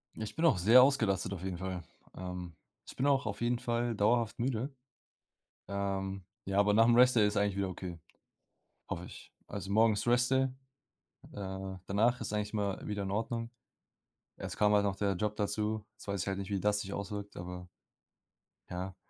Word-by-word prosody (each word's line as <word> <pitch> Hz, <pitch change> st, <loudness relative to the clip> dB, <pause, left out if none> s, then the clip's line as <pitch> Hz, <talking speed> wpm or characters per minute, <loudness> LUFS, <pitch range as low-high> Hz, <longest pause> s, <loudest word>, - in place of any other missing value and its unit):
Ich 110 Hz, -1 st, -6 dB
bin 165 Hz, -, +1 dB
auch 160 Hz, -, +5 dB
sehr 110 Hz, +8 st, +8 dB
ausgelastet 110 Hz, -8 st, +2 dB
auf 90 Hz, -2 st, -7 dB
jeden 95 Hz, -2 st, -3 dB
Fall. 95 Hz, 0 st, -4 dB, 0.3 s
Ähm, 90 Hz, -1 st, -6 dB, 0.3 s
ich -, -, -9 dB
bin 130 Hz, -, 0 dB
auch 140 Hz, -3 st, +3 dB
auf 105 Hz, 0 st, -4 dB
jeden 120 Hz, 0 st, +1 dB
Fall 120 Hz, -1 st, -1 dB
dauerhaft 115 Hz, +2 st, +2 dB
müde. 125 Hz, +2 st, -1 dB, 1.0 s
Ähm, 95 Hz, -1 st, -2 dB, 0.2 s
ja, 95 Hz, +1 st, -1 dB
aber 100 Hz, 0 st, +5 dB
nachm 115 Hz, +2 st, +6 dB
Rest 125 Hz, +1 st, +6 dB
Day 105 Hz, -2 st, +6 dB
ist 105 Hz, +1 st, -1 dB
eigentlich 100 Hz, -1 st, +1 dB
wieder 100 Hz, -1 st, 0 dB
okay, 90 Hz, -1 st, -6 dB, 0.9 s
hoffe 85 Hz, -, -4 dB
ich. -, -, -12 dB
Also 100 Hz, -2 st, -6 dB
morgen 110 Hz, +1 st, +5 dB
ist 105 Hz, -, -3 dB
Rest 125 Hz, +1 st, +3 dB
Day 135 Hz, 0 st, +3 dB, 0.8 s
äh, 95 Hz, -1 st, -5 dB
danach 115 Hz, +5 st, +2 dB
ist 110 Hz, -, -4 dB
eigentlich 105 Hz, 0 st, -1 dB
immer 100 Hz, -3 st, -2 dB
wieder 105 Hz, -1 st, -2 dB
in 95 Hz, -, -3 dB
Ordnung. 115 Hz, +3 st, -2 dB, 0.9 s
Jetzt -, -, -6 dB
kam 105 Hz, 0 st, +4 dB
halt 105 Hz, -1 st, +4 dB
noch 100 Hz, -1 st, 0 dB
der 100 Hz, -1 st, +1 dB
Job 105 Hz, +3 st, -2 dB
dazu. 105 Hz, +1 st, -1 dB
Jetzt 105 Hz, -, -15 dB
weiß 100 Hz, -2 st, -1 dB
ich -, -, -5 dB
halt 95 Hz, 0 st, -1 dB
nicht, 100 Hz, 0 st, -5 dB
wie 100 Hz, -2 st, 0 dB
das 105 Hz, +1 st, +2 dB
sich 100 Hz, -1 st, -6 dB
auswirkt, 100 Hz, 0 st, -5 dB
aber 90 Hz, 0 st, -7 dB, 1.0 s
Ja. 90 Hz, +1 st, -4 dB
105 Hz, 190 wpm, -32 LUFS, 95-115 Hz, 1.0 s, sehr